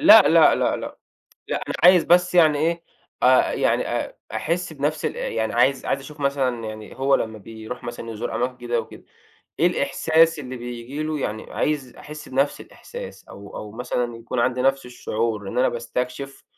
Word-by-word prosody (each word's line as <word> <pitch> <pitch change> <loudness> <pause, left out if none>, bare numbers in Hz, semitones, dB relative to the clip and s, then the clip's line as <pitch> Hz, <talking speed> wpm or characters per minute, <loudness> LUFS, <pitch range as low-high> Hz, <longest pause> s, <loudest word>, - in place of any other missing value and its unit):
لأ 315 +2 +9
لأ - - +6
لأ - - +1
لأ. - - -7 0.5
لأ، - - 0
أنا - - -3
عايز 180 -1 +7
بس 180 +1 +4
يعني 155 -4 +5
إيه 165 +2 0 0.4
أ 130 +1 +5
يعني - - +1
أ - - -3 0.2
أحسّ 170 +1 -2
بنفس 150 +1 -2
الا - - -2
يعني 110 -1 -1
عايز 130 +3 +2
عايز 135 - 0
أشوف 150 +2 -12
مثلًا 135 -4 0
يعني 110 +1 -8
هو 135 +1 +3
لمّا 110 -4 -1
بيروح 110 +3 -9
مثلًا 120 -1 -6
يزور 110 0 -4
أماكن 125 +1 -1
جديدة 120 -1 -1
وكده، 110 - -12 0.6
إيه - - +5
الإحساس 165 0 +2
اللي 130 -2 -6
بييجي 120 +4 -6
له؟ 155 -1 -2
يعني 110 -4 -4
عايز 140 -5 -1
أحسّ 150 0 -10
بنفْس 135 +2 0
الإحساس - - -10
أو 100 0 -11
أو 105 -1 -7
مثلًا 120 0 -2
يكون 115 +2 -4
عندي 125 +1 +1
نفس 135 0 +2
الشعور 110 -4 -3
إن - - -5
أنا 125 - +4
باستكشف 125 +3 -4
130 Hz, 180 wpm, -23 LUFS, 120-150 Hz, 0.6 s, لأ